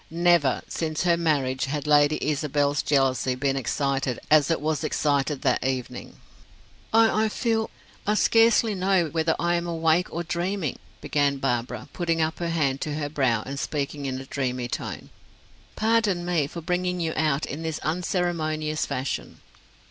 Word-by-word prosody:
Never, 170 -5 +2
since 155 -1 -2
her 175 -1 +4
marriage, 140 -6 0
had 145 +1 -3
Lady 150 0 +4
Isabel's 145 -1 +1
jealousy 130 -3 +1
been 135 +1 0
excited 135 0 -1
as 150 -1 +5
it 165 - +1
was 155 +1 -1
excited 145 -2 0
that 130 -3 +2
evening. 130 -1 -4 0.8
"I 220 -1 +4
I - - 0
feel 225 0 0 0.4
I 210 - +3
scarcely 225 0 +4
know 185 -3 +1
whether 160 +1 +1
I 175 0 +1
am 170 0 -3
awake 165 +1 +1
or 170 - -3
dreaming," 175 -2 -2 0.2
began 145 -1 +1
Barbara, 125 -3 -2
putting 165 -2 -1
up 160 0 0
her 170 -1 -2
hand 140 -5 0
to 150 -1 -2
her 145 -1 -3
brow 130 -7 +1
and 140 +1 -5
speaking 145 -1 -3
in 130 -1 -3
a 135 - -8
dreamy 125 -3 -2
tone. - - -5 0.6
"Pardon 220 -5 +1
me 170 -5 +1
for 170 +3 -7
bringing 180 +1 -1
you 165 -2 -1
out 155 -2 +1
in 150 - -6
this 160 -1 -3
unceremonious 155 -3 -1
fashion." 130 +2 -4
155 Hz, 160 wpm, -25 LUFS, 140-175 Hz, 0.8 s, as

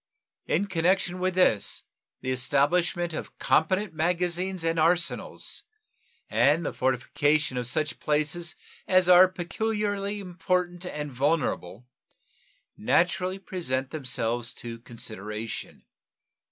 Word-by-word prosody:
In 190 +6 +1
connection 185 0 +1
with 185 0 0
this 115 - +2 0.4
the 130 - -2
establishment 160 +7 +1
of - - -6
competent 185 +4 +2
magazines 180 +2 0
and 165 0 +1
arsenals 170 +2 0 0.7
and 150 +4 +3
the - - -2
fortification 130 +3 +1
of 125 -1 -2
such 155 +3 -1
places 155 +4 0 0.3
as 185 -1 +4
are 180 +1 +9
peculiarly 205 +2 -2
important 180 -1 -2
and 150 -3 -4
vulnerable 125 - -1 0.9
naturally 180 - +1
present 135 -9 -3
themselves 120 -4 -2
to 115 -1 -7
consideration. 110 -2 -6
165 Hz, 100 wpm, -27 LUFS, 130-180 Hz, 0.9 s, are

